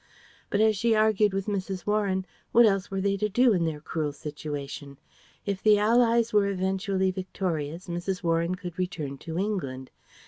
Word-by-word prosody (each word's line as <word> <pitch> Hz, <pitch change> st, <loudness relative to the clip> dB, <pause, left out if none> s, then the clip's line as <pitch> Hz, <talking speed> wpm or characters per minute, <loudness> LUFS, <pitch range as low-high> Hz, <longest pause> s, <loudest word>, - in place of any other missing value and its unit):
But 205 Hz, -, +1 dB
as 220 Hz, 0 st, +4 dB
she 225 Hz, +3 st, +2 dB
argued 215 Hz, -1 st, +3 dB
with 195 Hz, 0 st, -2 dB
Mrs. 190 Hz, -3 st, -3 dB
Warren, 200 Hz, -3 st, 0 dB, 0.3 s
what 235 Hz, 0 st, +7 dB
else 195 Hz, -3 st, +1 dB
were 195 Hz, 0 st, -2 dB
they 200 Hz, 0 st, +1 dB
to 210 Hz, +1 st, 0 dB
do 240 Hz, +3 st, +4 dB
in 175 Hz, -3 st, +1 dB
their 155 Hz, -2 st, -2 dB
cruel 155 Hz, 0 st, -3 dB
situation? 145 Hz, -1 st, -6 dB, 0.5 s
If 200 Hz, -2 st, -2 dB
the 215 Hz, -1 st, +5 dB
Allies 230 Hz, +1 st, +3 dB
were 205 Hz, -1 st, +4 dB
eventually 190 Hz, 0 st, 0 dB
victorious, 180 Hz, -3 st, -3 dB
Mrs. 175 Hz, +2 st, -3 dB
Warren 170 Hz, +1 st, +1 dB
could 180 Hz, 0 st, -8 dB
return 155 Hz, -7 st, -3 dB
to 160 Hz, 0 st, -6 dB
England. 140 Hz, -11 st, -3 dB
190 Hz, 170 wpm, -27 LUFS, 165-210 Hz, 0.5 s, what